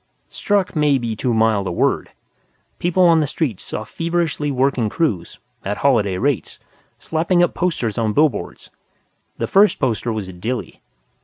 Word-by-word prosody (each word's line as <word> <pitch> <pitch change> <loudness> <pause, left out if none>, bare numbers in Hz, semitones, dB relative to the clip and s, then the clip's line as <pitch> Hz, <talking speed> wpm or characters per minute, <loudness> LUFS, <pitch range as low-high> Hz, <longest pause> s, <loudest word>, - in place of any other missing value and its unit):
Struck 200 -4 0
may 150 -2 +3
be 115 -3 -3
too 125 +3 -1
mild 110 -3 +2
a - - -2
word. 85 - 0 0.7
People 180 +1 +2
on 165 -2 +6
the 150 - +1
streets 130 - -2
saw 110 - -5
feverishly 165 +1 -2
working 130 -4 +1
crews 100 - -2 0.3
(at 100 +1 -3
holiday 105 -9 +2
rates!) 135 +2 -1 0.4
slapping 175 +2 +1
up 175 - +1
posters 125 - -1
on 110 -2 +1
billboards. 145 -2 0 0.7
The - - -1
first 200 +2 +4
poster 120 -3 -1
was 110 -4 -4
a 95 - -9
dilly. 115 +8 -5
130 Hz, 155 wpm, -20 LUFS, 110-165 Hz, 0.7 s, on